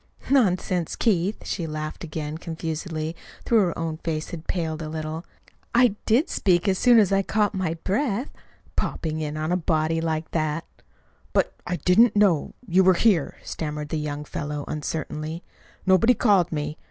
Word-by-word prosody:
"Nonsense, 185 - +2
Keith!" 200 -2 0
She 170 -4 -3
laughed 155 +1 -5
again 155 -1 -5
confusedly, 160 -1 -4 0.3
though 235 - +3
her 185 -6 +2
own 165 -1 -3
face 160 -1 -3
had 165 -2 -7
paled 160 -3 -2
a 155 - -5
little. 155 +1 -4 0.5
"I 240 -4 +5
did 245 +9 +4
speak 175 -2 +2
as 190 -1 +2
soon 245 -1 +6
as 205 -4 +5
I 195 0 +4
caught 210 +1 +1
my 185 -4 -1
breath; 235 +4 0 0.4
popping 155 -1 -2
in 155 -1 -3
on 155 +2 -2
a - - +3
body 160 -1 +1
like 160 -1 -2
that!" 155 0 -1 0.7
"But - - +2
I 180 - 0
didn't 210 +7 +4
know 195 -8 +3
you 190 +1 +4
were 185 0 +5
here," 180 -6 +2
stammered 150 -1 -4
the 155 - -1
young 150 0 -4
fellow 145 0 -4
uncertainly. 155 +2 -4 0.4
"Nobody 210 +6 +5
called 195 -7 +3
me. 150 -1 -3
165 Hz, 165 wpm, -25 LUFS, 155-195 Hz, 0.7 s, soon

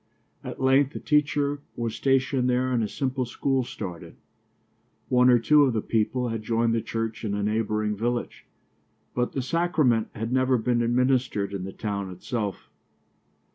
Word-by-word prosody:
At - - -7
length 135 +2 +3
a - - -3
teacher 145 -1 +1 0.2
was 115 -2 -3
stationed 135 0 +1
there 125 +1 +1
and 120 -3 +1
a - - -1
simple 130 +3 -2
school 135 +2 0 0.2
opened. 90 -5 -7 0.9
One 125 0 +5
or 125 - +7
two 150 +6 +4
of 135 -4 +3
the 110 - 0
people 120 +3 0
had 115 -1 -3
joined 115 +1 +1
the 115 - +1
church 115 0 -4
in 100 -2 -1
a 105 - -2
neighboring 105 0 0
village, 120 +3 -3 0.7
but 125 0 -1
the 135 - -2
sacrament 145 -6 +1
had 115 +3 -3
never 130 0 +3
been 120 +1 +1
administered 120 -4 +1
in 95 -2 -4
the 95 - -6
town 100 -1 -4
itself. 100 +2 -5
120 Hz, 165 wpm, -26 LUFS, 110-130 Hz, 0.9 s, or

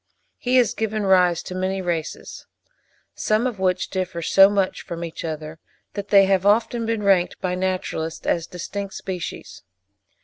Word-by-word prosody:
He 250 +1 0
has 245 -3 +4
given 220 -1 -2
rise 180 -3 +3
to - - -7
many 185 +1 -1
races, 170 -3 -4 0.7
some 215 +3 0
of 240 -6 -2
which 185 -1 0
differ 185 -3 -3
so 195 +4 +6
much 200 -2 0
from 170 0 -6
each 165 -1 -6
other, 155 -1 -6 0.3
that 200 -1 -5
they 200 -1 +6
have 190 -1 +2
often 225 +3 +2
been 225 -2 -1
ranked 190 -3 +2
by 180 -1 -2
naturalists 180 -3 -3
as 170 -1 0
distinct 195 +3 -6
species. 185 -3 -6
190 Hz, 160 wpm, -23 LUFS, 175-205 Hz, 0.7 s, so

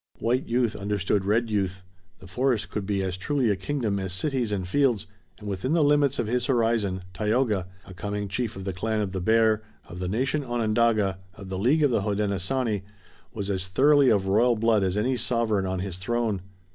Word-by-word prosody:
White 125 +3 0
youth 120 -2 +1
understood 100 -1 -1
red 110 +3 +1
youth. 95 -2 -1 0.4
The - - -12
forest 125 +2 0
could 100 -3 -3
be 100 -2 0
as 90 -1 -3
truly 125 +3 +1
a - - +1
kingdom 105 0 -2
as 95 -1 -3
cities 125 +2 -1
and 95 -3 -2
fields, 125 -1 +2 0.3
and 105 - -10
within 100 - -2
the 165 -2 +4
limits 145 -1 +3
of - - 0
his 125 +3 -1
horizon 115 -7 +1
Tayoga, 105 -1 0 0.2
a 95 - -11
coming 100 +3 -4
chief 110 +3 -3
of 95 - -7
the 95 - -2
clan 110 +4 -1
of 100 -2 -2
the 95 -1 -3
Bear, 110 +1 +3 0.3
of 90 - -9
the 90 -1 -2
nation 135 +8 0
Onondaga, 110 -5 +1 0.2
of 100 -2 -10
the 95 -1 -3
League 140 +9 +3
of 145 - +3
the 115 - +2
Hodenosaunee, 105 +2 -1 0.5
was 100 -2 -3
as 95 -1 -2
thoroughly 140 +7 +5
of 100 -3 +2
royal 115 +5 +3
blood 110 -2 +2
as 95 +1 0
any 125 +4 +1
sovereign 115 -4 0
on 95 0 -2
his 95 -2 -5
throne. 110 0 -1
105 Hz, 200 wpm, -26 LUFS, 95-120 Hz, 0.5 s, thoroughly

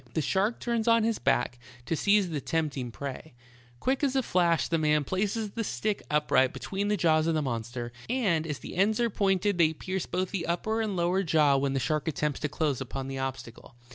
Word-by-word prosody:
The - - +2
shark 200 - +1
turns 235 -1 -1
on 230 -1 +4 0.2
back 120 0 +1 0.3
to 165 - -1
seize 200 +1 +3
the 150 -3 -2
tempt 155 -2 -1
ing 125 -3 -4
prey; 140 +3 -7 0.4
quick 265 +2 0
as 275 -2 +1
a 265 - +2
flash 170 -5 +2
the 165 - 0
man 150 -1 +2
places 205 - -1
the 230 - -3
stick 210 -1 -2
upright 150 -3 +3
between 200 +1 -3
the 210 0 +1
jaws 160 -2 +3
of 165 - +1
the 155 - +1
monster, 120 -1 -4 0.2
and 195 -11 +1
as 150 -3 -3
the - - -9
ends 205 +5 +2
are 235 -1 +1
pointed 195 -1 +1
they 160 -1 +4
pierce 185 +3 -4
both 185 0 -2
the 185 -4 -3
upper 220 +6 0
and 215 -3 -2
lower 175 +2 +1
iaw 150 -5 +3
when 135 0 0
the 135 - +1
shark 150 +5 -1
attempts 150 -1 -1
to 150 - -2
close 150 -3 -1
upon 135 +1 -5
the 135 0 -4
obstacle. 130 -3 -6
165 Hz, 215 wpm, -28 LUFS, 140-200 Hz, 0.4 s, on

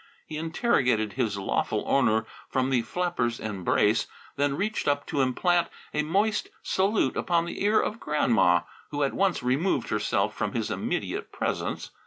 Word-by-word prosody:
He 155 - -7
interrogated 140 - +1
his 110 -6 -1
lawful 100 - -1
owner 110 -5 +2 0.2
from 130 0 0
the 125 -3 +3
flapper's 120 -2 -1
embrace, 105 +1 +1 0.3
then 145 0 0
reached 215 +3 -1
up 145 0 +1
to 140 - 0
implant 170 +7 +2 0.3
a 150 - +1
moist 200 +8 +1
salute 195 +3 +1
upon 170 -1 +1
the 170 - -4
ear 210 +2 +4
of 225 - -2
Grandma, 115 -12 +3 0.3
who 145 -1 -1
at 140 - 0
once 195 -8 +1
removed 135 +10 +1
herself - - 0
from - - -2
his - - -2
immediate - - -3
presence. - - -3
145 Hz, 155 wpm, -27 LUFS, 120-175 Hz, 0.3 s, ear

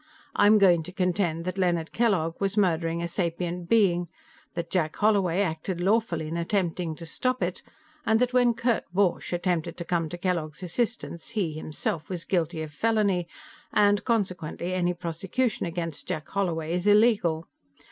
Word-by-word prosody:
I'm 210 +1 +6
going 180 -5 +5
to 160 - -8
contend 180 -3 0
that 185 +1 -3
Leonard 170 -3 +1
Kellogg 190 -9 +1
was 195 +1 0
murdering 170 -3 +1
a - - -1
sapient 170 0 -3
being, 180 -6 +3 0.5
that 170 -1 -4
Jack 155 -4 0
Holloway 200 -4 +2
acted 175 0 -2
lawfully 185 -4 +1
in 165 +2 -3
attempting 170 -2 -1
to 165 - -9
stop 255 +7 -1
it 175 +1 -2 0.4
and 220 -4 +3
that 250 0 +1
when 245 -2 +4
Kurt 235 -1 0
Borch 185 -1 +1
attempted 175 -2 -1
to 170 - -5
come 165 -2 0
to 175 - -6
Kellogg's 175 -3 -2
assistance 215 -1 -2
he, 200 -9 -1
himself, 155 0 -4
was 180 -3 -4
guilty 165 -3 0
of 150 -1 -8
felony, 200 -2 +1 0.4
and 205 -1 +3
consequently 185 -6 -1
any 180 -1 +1
prosecution 180 +8 -2
against 165 -2 -5
Jack 155 -1 -3
Holloway 170 -5 -1
is 180 +3 -1
illegal. 205 -7 +4
180 Hz, 160 wpm, -27 LUFS, 165-205 Hz, 0.5 s, I'm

